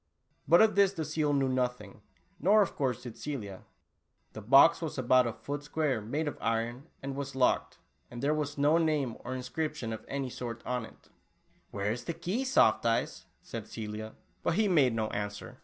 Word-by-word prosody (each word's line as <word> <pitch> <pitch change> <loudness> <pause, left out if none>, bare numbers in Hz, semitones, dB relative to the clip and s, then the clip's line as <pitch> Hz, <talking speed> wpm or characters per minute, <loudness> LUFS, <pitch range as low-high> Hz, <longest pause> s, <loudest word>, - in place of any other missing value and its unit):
But 170 +8 +7
of 220 - +3
this 200 -1 +4
the 160 -4 -3
seal 155 -1 0
knew 140 -2 +2
nothing, 125 -5 -2 0.4
nor, 210 +3 +5
of 195 - -5
course, 125 -3 -1
did 120 -3 -8
Celia. 105 -10 -6 0.7
The 110 - -7
box 135 - +6
was 160 -3 -4
about 130 0 +4
a - - -1
foot 140 +6 -5
square, 145 -5 -1
made 145 +9 -2
of 145 - -4
iron, 115 +5 -2 0.2
and 135 0 -4
was 140 -1 -5
locked, 130 -1 +1 0.3
and 120 - -8
there 145 +4 +1
was 150 -1 -3
no 150 +4 +4
name 150 -7 0
or 130 +1 -5
inscription 130 -1 -3
of 110 - -7
any 135 -2 -3
sort 115 -2 -6
on 125 -2 -2
it. - - -21 0.6
Where 100 +1 -2
is 120 +2 -5
the 170 - -3
key, 185 +10 -2
Soft 180 - +4
Eyes?" 115 0 0 0.2
said - - -7
Celia, 110 0 -6 0.3
but - - 0
he 215 0 +3
made 140 - +3
no 110 -1 0
answer. 105 +5 -5
130 Hz, 190 wpm, -30 LUFS, 115-155 Hz, 0.7 s, But